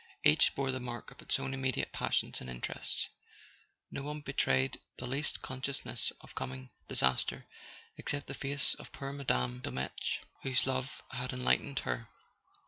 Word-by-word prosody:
Each 75 - +6
bore 135 -1 +1
the 130 - -2
mark 120 -2 -5
of - - -13
its - - +3
own 135 - -3
immediate 130 -2 0
passions - - +1
and 65 - -5
interests; - - +1 0.8
not 140 - -4
one 150 +1 -4
betrayed 65 - +2 0.2
the 125 - -5
least 140 +4 +1
consciousness 130 +1 +1
of - - -13
coming 65 0 -5 0.2
disaster 65 0 +3 0.5
except 145 -1 -2
the - - -6
face 140 0 +2
of - - -9
poor 135 0 -5
Madame 65 - 0
de - - -3
Dolmetsch, 65 +1 -2 0.2
whose 130 -1 +4
love 130 0 -1
had 125 +1 -2
enlightened 135 +2 +2
her. 115 -2 -2
130 Hz, 155 wpm, -33 LUFS, -, 0.8 s, Each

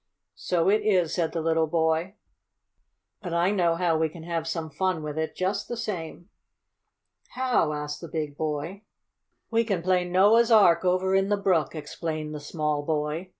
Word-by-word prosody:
"So 175 -1 -1
it 210 +2 +4
is!" 185 -6 +2
said 170 -3 0
the 165 - -3
little 160 0 +2
boy. 160 +4 0 1.1
"But 175 -4 -4
I 175 +3 +2
know 175 -5 +2
how 170 -1 +1
we 160 0 +1
can 160 +1 -11
have 165 -1 -3
some 165 -2 -4
fun 180 +1 -1
with 150 -1 -5
it, 160 0 -3
just 185 +2 -2
the 240 - -5
same!" 175 -6 -5 1.1
"How?" 250 -11 +1
asked 150 0 -5
the 170 - -7
big 155 -2 -4
boy. 155 +5 -4 0.7
"We 230 0 +3
can 195 -7 -2
play 180 0 +2
Noah's 205 +6 +4
Ark 195 -7 +5
over 185 +1 +1
in 195 +1 +2
the 205 - +2
brook," 175 -7 +1
explained 155 0 -5
the 150 - -5
small 150 0 -2
boy. 150 +3 -2
170 Hz, 175 wpm, -26 LUFS, 160-190 Hz, 1.1 s, Ark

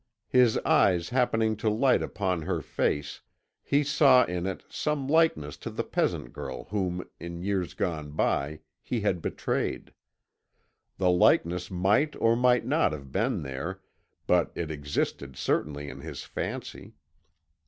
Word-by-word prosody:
His 125 -3 +4
eyes 85 -3 +3
happening 115 -3 +2
to 110 0 0
light 125 +5 +3
upon 95 -4 -1
her 80 - -2
face, 75 0 -2 0.4
he 145 +1 +2
saw 135 -3 +5
in 90 +1 -3
it 95 - -4
some 150 -3 -2
likeness 145 - +2
to - - -6
the - - -3
peasant - - -1
girl - - -6
whom 90 -3 -2
in 85 0 -7
years 95 -3 -1
gone 80 -5 -2
by 75 0 -1 0.2
he 120 -3 -2
had 95 -4 0
betrayed. - - -2 1.0
The 90 -1 +3
likeness 90 0 +3
might 100 +11 +2
or 115 0 +3
might 125 0 +3
not 140 - +2
have 70 -3 -8
been - - 0
there, 65 -1 -5 0.5
but - - +2
it 80 -2 -3
existed 70 -2 -3
certainly 75 0 -1
in - - -8
his - - -7
fancy. - - -6
90 Hz, 145 wpm, -28 LUFS, 80-120 Hz, 1.0 s, saw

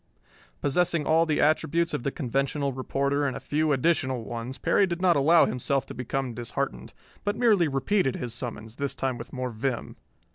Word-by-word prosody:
Possessing 165 +1 +1
all 165 +1 +3
the 155 - +1
attributes 165 +2 +2
of - - -1
the 140 - -1
conventional 140 +1 -1
reporter 140 +2 -1
and 130 - -3
a - - -6
few 155 +1 0
additional 130 -4 +1
ones, 120 +3 -5
Perry 200 - +3
did 175 -1 -3
not 180 -2 +4
allow 160 +4 +5
himself 135 +2 -1
to - - -8
become 130 0 -3
disheartened, 120 +4 -4 0.3
but 205 0 0
merely 210 -9 +4
repeated 140 +2 +1
his 120 -2 -4
summons, 115 -2 -5
this 140 -1 -2
time 130 -2 -2
with - - -8
more 130 -1 -3
vim. 120 +3 -3
140 Hz, 180 wpm, -27 LUFS, 130-160 Hz, 0.3 s, allow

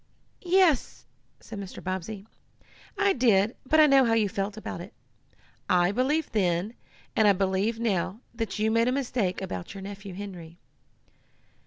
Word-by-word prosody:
"Yes," 360 -5 +2 0.3
said 220 -3 -9
Mr. 195 -2 -8
Bobbsey, 190 +2 -4 0.7
"I 400 -1 +3
did, 225 -4 +3
but 315 +3 +4
I 310 - +9
know 275 -2 +6
how 230 -2 +2
you 220 -2 +3
felt 200 +2 -3
about 215 - -6
it. - - -10 0.8
I 175 0 +4
believed 275 +6 0
then, 185 0 0 0.4
and 220 - +4
I 200 - +6
believe 195 +4 0
now, 200 -3 -1
that 225 -3 -4
you 215 +1 +1
made 230 +1 +3
a - - +2
mistake 240 -9 -1
about 95 - -6
your 195 - -7
nephew 195 -1 -8
Henry." 180 -4 -8
210 Hz, 155 wpm, -27 LUFS, 190-240 Hz, 0.8 s, I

